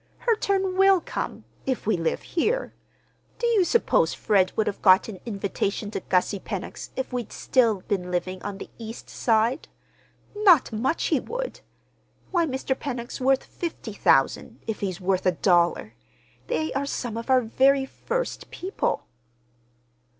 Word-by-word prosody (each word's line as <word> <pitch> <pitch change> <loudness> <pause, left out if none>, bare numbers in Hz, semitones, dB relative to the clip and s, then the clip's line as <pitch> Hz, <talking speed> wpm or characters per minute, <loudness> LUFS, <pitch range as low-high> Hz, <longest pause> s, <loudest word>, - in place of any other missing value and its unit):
"Her 465 -2 +2
turn 385 -2 0
will 390 -1 +6
come—if 265 -5 -5
we 220 - +2
live 165 -2 -1
here. 450 +9 -1 0.6
Do 475 - -2
you 455 -5 +4
suppose 470 +6 +2
Fred 190 -3 +2
would 220 - +1
have 200 - -3
got 190 -1 +6
an 205 -5 -7
invitation 200 0 -2
to - - -2
Gussie 185 +2 0
Pennock's 195 -1 -6
if 260 -1 -4
we'd 245 -3 -3
still 230 -7 +2
been 180 -2 -2
living 185 +1 -2
on 205 -1 -5
the - - -9
East 225 0 -8
Side? 230 +5 +1 0.7
Not 370 - +5
much 255 +9 0
he - - +4
would! - - -5 0.7
Why, 345 -3 +2
Mr. 265 -1 -1
Pennock's 250 -3 -5
worth 265 +1 +3
fifty 320 - -6
thousand, 200 - +2
if 220 - -3
he's 190 -3 -3
worth 185 0 0
a 180 - +4
dollar! 170 - +2 0.5
They 155 +1 -1
are 280 +1 -1
some 240 -5 -3
of 230 +3 -6
our 260 -1 +5
very 265 +4 +3
first - - -4
people." 375 +3 -2
230 Hz, 150 wpm, -25 LUFS, 195-320 Hz, 0.7 s, will